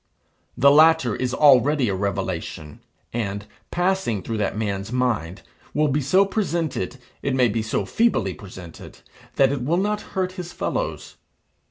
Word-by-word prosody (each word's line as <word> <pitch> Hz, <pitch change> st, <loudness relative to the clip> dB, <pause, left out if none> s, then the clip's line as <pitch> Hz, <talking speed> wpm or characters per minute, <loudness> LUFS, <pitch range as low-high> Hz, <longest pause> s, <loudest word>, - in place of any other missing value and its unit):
The 140 Hz, +3 st, +6 dB
latter 155 Hz, -5 st, +5 dB
is 125 Hz, -1 st, -2 dB
already 140 Hz, -1 st, +4 dB
a 100 Hz, -, 0 dB
revelation; 95 Hz, -5 st, -4 dB, 0.3 s
and, 100 Hz, -3 st, -3 dB, 0.2 s
passing 180 Hz, -, 0 dB
through 115 Hz, -, -3 dB
that 105 Hz, 0 st, -1 dB
man's 100 Hz, -1 st, -3 dB
mind, 120 Hz, -9 st, -1 dB, 0.3 s
will 150 Hz, 0 st, +2 dB
be 145 Hz, +2 st, +1 dB
so 185 Hz, +9 st, +4 dB
presented, 170 Hz, -9 st, -2 dB, 0.2 s
it 135 Hz, -1 st, -1 dB
may 125 Hz, -2 st, +4 dB
be 110 Hz, +1 st, -1 dB
so 110 Hz, +1 st, -2 dB
feebly 225 Hz, -, +1 dB
presented, 90 Hz, -4 st, -11 dB, 0.3 s
that 135 Hz, -1 st, +4 dB
it 140 Hz, -3 st, -2 dB
will 160 Hz, +7 st, +1 dB
not 210 Hz, +2 st, 0 dB, 0.2 s
hurt 185 Hz, -1 st, 0 dB
his 180 Hz, -2 st, -8 dB
fellows. -, -, -3 dB
130 Hz, 150 wpm, -23 LUFS, 105-165 Hz, 0.3 s, The